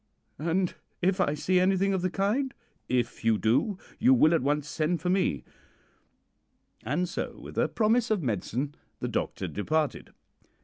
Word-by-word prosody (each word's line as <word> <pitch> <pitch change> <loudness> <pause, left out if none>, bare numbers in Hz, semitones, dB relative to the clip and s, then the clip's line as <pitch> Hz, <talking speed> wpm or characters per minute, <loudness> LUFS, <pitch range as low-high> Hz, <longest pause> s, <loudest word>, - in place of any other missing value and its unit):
"'And 170 +4 0 0.3
if 190 +1 +2
I 150 -4 +1
see 180 +5 +2
anything 195 +1 +2
of 190 - 0
the 185 - +1
kind?' 215 +9 0 0.3
"'If 120 -2 -1
you 115 -1 +3
do, 130 - +1 0.2
you 255 +4 +6
will 160 -8 +5
at 165 - +3
once 145 +2 0
send 160 +3 0
for 180 +3 0
me;' 185 - +1 1.4
and 150 +10 0
so, 180 - -4
with - - -10
a - - +2
promise 225 +1 +2
of 210 -6 +1
medicine, 125 +5 -2 0.3
the - - -2
doctor - - -2
departed. 155 +8 -1
175 Hz, 160 wpm, -28 LUFS, 145-195 Hz, 1.4 s, you